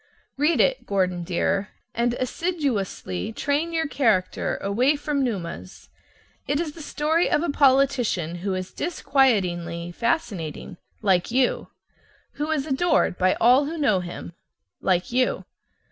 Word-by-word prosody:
Read 300 +4 +2
it, - - +2
Gordon 185 -3 0
dear, 190 +3 0 0.2
and 235 +1 0
assiduously 255 - -2
train 290 +8 -1
your 325 -1 0
character 220 -11 +1
away 245 +9 +2
from 290 -1 -1
Numa's. 185 -6 -5 0.6
It's 300 +3 -1
the 320 - -11
story 310 +3 +1
of 300 - +2
a 345 - 0
politician 260 - +2
who 190 +2 -2
is 185 0 -5
disquietingly 185 - 0
fascinating 195 - -2 0.3
(like 185 -4 +2
you). 250 +1 +1 0.7
Who 300 +2 -2
is 300 -3 0
adored 305 - +1
by 185 0 +3
all 250 +5 +5
who 325 +3 -4
know 220 -11 +2
him 175 -1 -7 0.5
(like 180 +1 +1
you). 255 +1 +1
245 Hz, 130 wpm, -24 LUFS, 185-290 Hz, 0.7 s, all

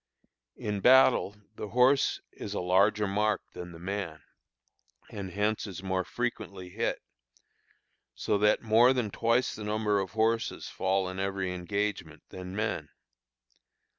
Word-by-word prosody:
In 105 -1 -3
battle 130 -2 +5 0.2
the 105 - -5
horse 125 +5 +3
is 105 - -7
a - - -1
larger 100 +4 +3
mark 105 +1 0
than 90 0 -8
the 85 - -10
man, 85 -4 -5 0.9
and 100 -2 -5
hence 105 +3 -1
is 95 -1 -8
more 95 -1 0
frequently 100 -5 -4
hit, - - -2 1.1
so 100 - 0
that 105 +2 +3
more 115 +3 +5
than 120 -5 -1
twice 115 +4 +1
the 110 - -7
number 105 -1 +1
of 95 +1 -4
horses 115 +1 0
fall 95 0 0
in 95 +1 -5
every 95 -1 -2
engagement 100 +4 -3
than 90 0 -8
men. 110 +1 -2
100 Hz, 135 wpm, -29 LUFS, 95-110 Hz, 1.1 s, battle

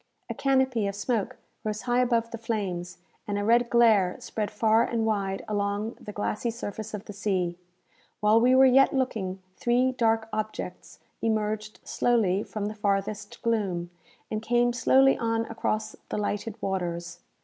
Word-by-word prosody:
A - - -1
canopy 265 -5 +1
of 200 - -3
smoke 210 0 -2 0.3
rose 215 -1 -3
high 245 0 +1
above 235 -2 +1
the 230 - -6
flames, 185 -6 -3 0.3
and 205 -1 -1
a 205 - -1
red 235 +2 +3
glare 220 -6 +4
spread 210 -2 -3
far 220 +1 +3
and 230 -2 -1
wide 195 -3 -1
along 205 +2 -1
the 210 - -7
glassy 210 +3 -2
surface 220 -1 -5
of 205 - -8
the 205 - -8
sea. 185 -4 -1 0.6
While 215 +2 +4
we 250 +2 +5
were 265 +1 +7
yet 270 +1 +5
looking, 195 -8 -2
three 250 +2 +2
dark 225 -3 +1
objects 215 -4 -5 0.2
emerged 215 -1 -1
slowly 210 -6 +1
from 210 -1 -4
the 210 - -3
farthest 205 0 -2
gloom, 190 -7 -1 0.4
and 215 0 -2
came 240 +1 +2
slowly 270 +2 +4
on 230 0 0
across 220 -1 -2
the - - -2
lighted 210 +1 -3
waters. 175 -2 -3
215 Hz, 160 wpm, -27 LUFS, 200-235 Hz, 0.6 s, were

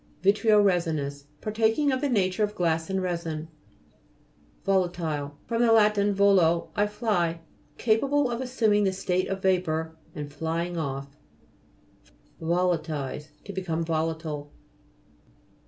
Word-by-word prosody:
VI'TREO 210 +1 +5
HES'INOUS 155 -6 0 0.2
Partaking 225 +7 +1
of 260 0 -1
the 285 - +1
nature 195 -3 +1
of 210 0 -1
glass 165 -1 0
and 190 -1 -1
resin. 165 -3 -3 1.2
VO'LATILE 170 -7 0
fr. 230 - -3
lat. 225 -3 +5
volo, 200 -4 +3
I 205 0 +2
fly. 180 -6 -1 0.4
Capa 225 +3 +2
ble 285 -2 +2
of 235 +1 -2
assuming 220 -5 +2
the 190 - +1
state 185 -1 -1
of 195 0 -4
vapour, 160 -4 0 0.2
and 145 -1 -6
flying 165 +3 -2
off. 140 -3 -4 1.3
VOLA'TILIZE 160 -4 -1 0.2
To 200 - -8
become 165 -3 -2
volatile. 160 -2 -2
180 Hz, 120 wpm, -27 LUFS, 160-210 Hz, 1.3 s, VI'TREO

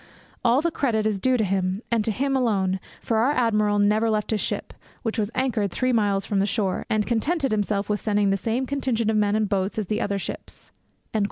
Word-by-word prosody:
All 245 +3 +4
the 340 +1 0
credit 225 -8 0
is 210 -2 0
due 255 +4 +2
to 220 - +1
him, 190 +1 -1
and 230 -2 +2
to 220 - 0
him 270 +5 0
alone, 195 -7 +1 0.2
for 225 - 0
our 250 +6 +3
admiral 215 -5 +2
never 210 +2 +3
left 215 0 0
his 215 - 0
ship, - - -3 0.3
which 225 -1 -2
was 210 -1 0
anchored 245 -6 0
three 255 +7 0
miles 205 -3 +2
from 200 - 0
the 200 - +2
shore, 200 -2 -1
and 215 -1 +1
contented 270 +4 0
himself 205 -1 0
with 210 -1 -1
sending 205 -2 +2
the - - +3
same 230 +6 -1
contingent 255 -5 0
of 215 - +1
men 205 0 +2
and 215 -1 +1
boats 195 +1 -1
as 215 - -1
the 210 +3 -2
other 200 0 -1
ships.' 195 - -7
215 Hz, 225 wpm, -24 LUFS, 205-240 Hz, 0.3 s, All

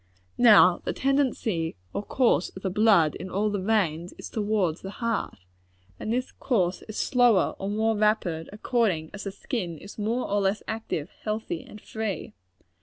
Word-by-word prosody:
Now 205 -7 +7
the - - -2
tendency 250 - 0 0.2
or - - -2
course 230 -4 +2
of 190 - -9
the 190 - -1
blood 200 -7 +4
in 185 - -7
all 205 +3 0
the 205 - -1
veins, 185 -5 0
is - - -8
towards 205 -6 0
the 190 - -6
heart; 230 -1 -2 0.6
and 215 - -3
this 250 +2 -1
course 185 -9 0
is 215 - -6
slower 245 -7 +3
or 195 - -3
more 220 +2 +1
rapid, 205 -6 0
according 210 -7 0
as 205 0 -7
the 195 - -3
skin 190 - -4
is 200 +7 -11
more 225 +4 -1
or 205 0 +1
less 195 +2 0
active, 220 -7 -4
healthy 215 -6 -3
and 210 - -12
free. 220 -2 -4
210 Hz, 170 wpm, -26 LUFS, 185-225 Hz, 0.6 s, Now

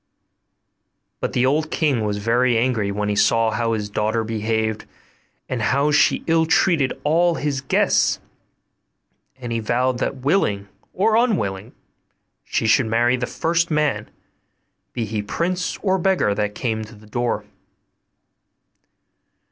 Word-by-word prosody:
But - - -3
the 125 - +2
old 155 +4 +1
king 145 -9 0
was 105 -1 -1
very 120 +3 +2
angry 115 -4 0
when 105 +1 -2
he 105 - 0
saw 115 +2 +3
how 115 +1 -1
his 105 -2 -2
daughter 110 +2 -1
behaved, 110 0 -2 0.6
and 125 - -3
how 140 +6 +2
she 150 - +3
ill 165 -1 +2
treated 160 -5 +2
all 170 +3 +2
his 145 -4 -2
guests; 135 - +2 1.2
and 120 -2 -6
he 115 - -1
vowed 120 +3 0
that, 135 - -1
willing 130 - 0 0.2
or 215 +4 +2
unwilling, 185 - 0 0.7
she - - -2
should 115 +2 +3
marry 120 +2 +2
the 125 -1 -3
first 170 +1 0
man, 150 -2 0 0.8
be 120 -2 -3
he 105 0 -3
prince 180 - -2
or 190 -2 +2
beggar, 180 - +2
that 105 0 -2
came 110 -3 -2
to 110 +1 -12
the 105 +1 -17
door. 120 +3 -2
120 Hz, 140 wpm, -21 LUFS, 110-150 Hz, 1.2 s, saw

